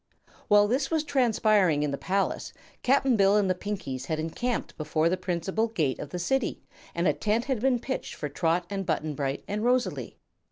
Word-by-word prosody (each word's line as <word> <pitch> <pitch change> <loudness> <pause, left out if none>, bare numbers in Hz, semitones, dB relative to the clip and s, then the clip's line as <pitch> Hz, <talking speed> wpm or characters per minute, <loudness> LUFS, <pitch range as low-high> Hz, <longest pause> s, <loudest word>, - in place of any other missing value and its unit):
While 205 0 +6
this 270 +5 0
was 320 -2 +1
transpiring 215 - +3
in 150 - 0
the - - -1
palace 195 +6 -1 0.3
Cap'n 270 -1 +3
Bill 200 0 +4
and 205 -2 +2
the 185 - +3
Pinkies 180 -10 -5
had 160 -1 -1
encamped 230 +10 -2
before 155 +1 0
the 185 - +1
principal 185 +4 -1
gate 160 - -1
of 145 - -6
the 180 - -5
City 245 +8 -1 0.3
and 170 +1 +1
a - - +4
tent 220 +3 0
had 265 -4 -1
been 255 +1 +2
pitched 260 +3 -4
for 150 - -4
Trot 165 +4 0
and 195 0 -3
Button 155 -3 -1
Bright 140 0 -3
and 210 +2 -2
Rosalie. 250 +1 0
195 Hz, 195 wpm, -27 LUFS, 160-235 Hz, 0.3 s, While